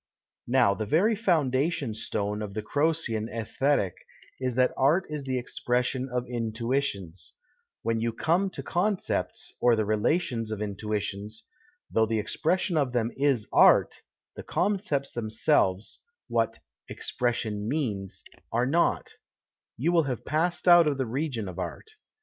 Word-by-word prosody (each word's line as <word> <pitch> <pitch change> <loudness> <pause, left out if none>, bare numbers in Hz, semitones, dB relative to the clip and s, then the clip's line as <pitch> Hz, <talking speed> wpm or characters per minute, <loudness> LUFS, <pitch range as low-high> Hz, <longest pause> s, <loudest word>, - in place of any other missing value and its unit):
Now 120 -5 +4
the 105 +1 -4
very 195 - +3
foundation 150 - +1
stone 105 -1 -2
of 100 -2 -6
the 110 - -3
Croccan 145 -5 0
ffisthetic 115 -1 0 0.5
is 130 -2 -2
that 130 0 +3
art 150 +8 +3
is 150 -2 -4
the 130 -1 -1
expression 125 +1 -1
of 125 -1 -2
intuitions; 115 - -3 0.5
when 115 0 0
you 115 +1 0
come 170 - +1
to - - -7
concepts, 195 +2 -1
or 120 -1 +5
the 110 -1 0
relations 115 - 0
of 110 - -3
intuitions, 105 - -4 0.5
though 110 0 +3
the 110 0 0
expression 175 - 0
of 135 -4 +1
them 120 -1 0
is 135 -6 +1
art, - - +5 0.3
the - - -6
concepts 175 -6 -1
themselves 110 -3 0 0.3
(what - - 0 0.2
" - - -65
expression 110 -4 -2
means 110 -10 -3
") - - -30
arc 125 +3 +1
not; 170 +2 +2 0.7
you 150 +9 +1
will 165 -3 +3
have 125 - -4
passed 170 +5 0
out 175 -2 +8
of 145 -2 0
the 130 - 0
region 125 -3 -3
of 90 0 -7
art. 95 - -6
125 Hz, 145 wpm, -27 LUFS, 110-155 Hz, 0.7 s, out